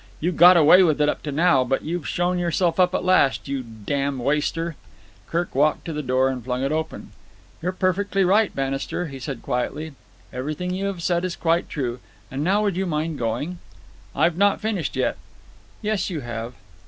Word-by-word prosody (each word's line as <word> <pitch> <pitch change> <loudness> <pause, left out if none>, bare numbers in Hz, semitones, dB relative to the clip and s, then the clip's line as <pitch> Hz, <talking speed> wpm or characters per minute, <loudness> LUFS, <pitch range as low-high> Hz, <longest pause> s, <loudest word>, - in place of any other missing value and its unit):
You've 175 +1 -1
got 175 +3 +8
away 165 +4 +7
with 155 -5 +3
it 150 0 +3
up - - -2
to 150 - -4
now, 155 -2 +3
but 135 +1 -1
you've 170 0 -3
shown 180 +1 0
yourself 170 0 0
up 180 0 +4
at - - -1
last. 185 -9 +3
You 135 -1 -2
damned 130 +4 -3
waster!" 150 +4 -1 0.5
Kirk 175 +1 -2
walked 150 +3 +2
to 165 - -4
the 150 - -3
door 130 -1 +2
and 130 -2 -4
flung 125 +1 -2
it 135 - 0
open. 160 0 -4 0.5
"You're 180 +2 -1
perfectly 195 +1 0
right, 205 +3 +3
Bannister," 135 +5 -2
he 135 -1 -8
said 130 -2 -6
quietly. 150 +5 -3 0.4
"Everything 155 +8 -3
you 190 +2 -2
have 190 -4 -3
said 175 0 +1
is 185 -1 -2
quite 170 +1 0
true. 125 -4 -3 0.3
And 135 +2 -2
now 200 +5 +2
would 200 -4 0
you 190 0 -1
mind 155 -1 -2
going?" 125 +10 -2 0.6
"I've 170 -1 +2
not 200 +1 +3
finished 210 -6 -2
yet." - - 0 0.7
"Yes, 210 -1 0
you 165 -5 -4
have." 120 0 -6
160 Hz, 190 wpm, -23 LUFS, 135-180 Hz, 0.7 s, got